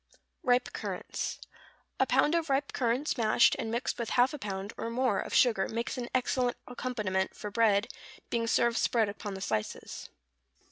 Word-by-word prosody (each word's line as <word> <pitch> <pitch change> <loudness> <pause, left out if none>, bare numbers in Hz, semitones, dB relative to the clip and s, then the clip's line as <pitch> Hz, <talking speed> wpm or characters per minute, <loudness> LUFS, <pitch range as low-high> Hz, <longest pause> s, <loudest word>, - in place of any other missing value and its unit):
=Ripe 250 -1 +2
Currants.= - - -4 0.6
A - - +3
pound 300 - +3
of 330 -2 0
ripe 275 +1 0
currants 250 +3 0
mashed, 220 +1 +5
and 225 - -2
mixed 235 +2 -2
with 235 - -2
half 250 +3 +5
a 295 - -5
pound, 195 -1 -4
or 230 - -4
more, 240 -3 +1
of - - -5
sugar, 220 -6 +3
makes 235 +3 -2
an 245 -2 -4
excellent 250 -1 +1
accompaniment 215 -7 -2
for 210 - -6
bread, 210 -1 +3 0.4
being 230 -1 0
served 235 0 +2
spread 225 -4 +2
upon 205 -1 -6
the 190 - -7
slices. 110 - -3
235 Hz, 170 wpm, -30 LUFS, 210-250 Hz, 0.6 s, mashed